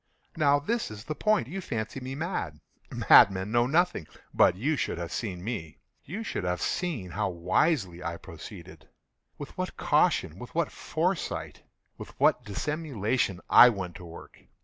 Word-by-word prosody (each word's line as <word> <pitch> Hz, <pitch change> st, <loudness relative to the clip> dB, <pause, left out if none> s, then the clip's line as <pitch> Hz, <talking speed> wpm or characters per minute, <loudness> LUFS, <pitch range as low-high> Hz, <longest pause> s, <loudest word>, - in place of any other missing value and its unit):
Now 145 Hz, -3 st, +4 dB
this 220 Hz, +12 st, -2 dB
is 110 Hz, 0 st, -9 dB
the 155 Hz, -, -4 dB
point. 215 Hz, -, +1 dB
You 190 Hz, +7 st, -5 dB
fancy 115 Hz, -4 st, -4 dB
me 130 Hz, +1 st, -6 dB
mad. 140 Hz, -, -4 dB, 0.3 s
Madmen 95 Hz, +1 st, +5 dB
know 120 Hz, +1 st, +3 dB
nothing. 160 Hz, -, +1 dB, 0.3 s
But 90 Hz, -, +5 dB
you 140 Hz, +11 st, 0 dB
should -, -, -2 dB
have 85 Hz, -1 st, -5 dB
seen 90 Hz, -6 st, -4 dB
me. 100 Hz, -9 st, -5 dB, 0.3 s
You 200 Hz, +10 st, -6 dB
should 160 Hz, -, -4 dB
have 90 Hz, 0 st, -1 dB
seen 140 Hz, -, -2 dB
how 100 Hz, +2 st, -1 dB
wisely 90 Hz, -, 0 dB
I 85 Hz, -1 st, -4 dB
proceeded—with 85 Hz, -4 st, -13 dB
what -, -, -4 dB
caution—with -, -, +1 dB
what -, -, 0 dB
foresight—with -, -, -5 dB
what 125 Hz, -, +3 dB
dissimulation 120 Hz, -, -2 dB
I 125 Hz, -, +9 dB
went 95 Hz, -6 st, -4 dB
to 90 Hz, -, -11 dB
work! 85 Hz, 0 st, -12 dB
110 Hz, 150 wpm, -28 LUFS, 90-150 Hz, 0.3 s, I